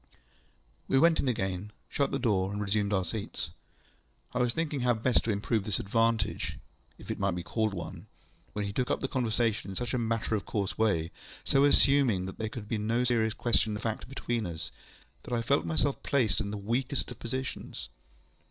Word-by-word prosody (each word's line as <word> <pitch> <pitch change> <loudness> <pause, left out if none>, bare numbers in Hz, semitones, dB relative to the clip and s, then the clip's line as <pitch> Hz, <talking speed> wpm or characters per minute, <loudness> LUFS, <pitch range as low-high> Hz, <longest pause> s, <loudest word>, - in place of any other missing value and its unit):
We 135 - +3
went 165 +4 +5
in - - +1
again, 95 -4 -1 0.2
shut 140 -1 0
the - - 0
door, 100 -6 +1
and 105 - -3
resumed 100 0 0
our 95 -3 +2
seats. 105 +3 -4 0.8
I 125 - 0
was 125 -1 +3
thinking 155 0 -1
how 125 -1 +3
best 115 +2 +2
to 115 - +2
improve 105 +1 0
this 100 -3 0
advantage, 115 -1 +1 0.4
if - - -7
it - - -4
might 100 -2 +1
be 90 - -4
called 110 0 0
one, 85 -2 -7 0.5
when 105 -1 -1
he 100 - -4
took 125 +3 0
up - - 0
the 135 - 0
conversation 115 -5 0
in 95 - -5
such 120 +2 -2
a 125 - +1
matter 115 -1 0
of 105 -2 +1
course 100 -2 -2
way, 90 -7 +1 0.3
so 140 +1 +4
assuming 135 -9 +5
that 95 - -7
there 110 -1 -1
could 110 -2 -7
be 110 0 -1
no 115 +4 +1
serious 115 -3 +2
question 110 -2 +2
of 105 - -6
fact 110 +1 -3
between 120 -5 -2
us, 85 0 -5 0.5
that 125 - -3
I 115 - 0
felt 85 -7 +2
myself 85 - +1
placed 125 -7 +2
in 100 - -2
the 105 - -3
weakest 125 +7 -1
of 125 - -9
positions. 120 - -4
110 Hz, 200 wpm, -30 LUFS, 100-125 Hz, 0.8 s, went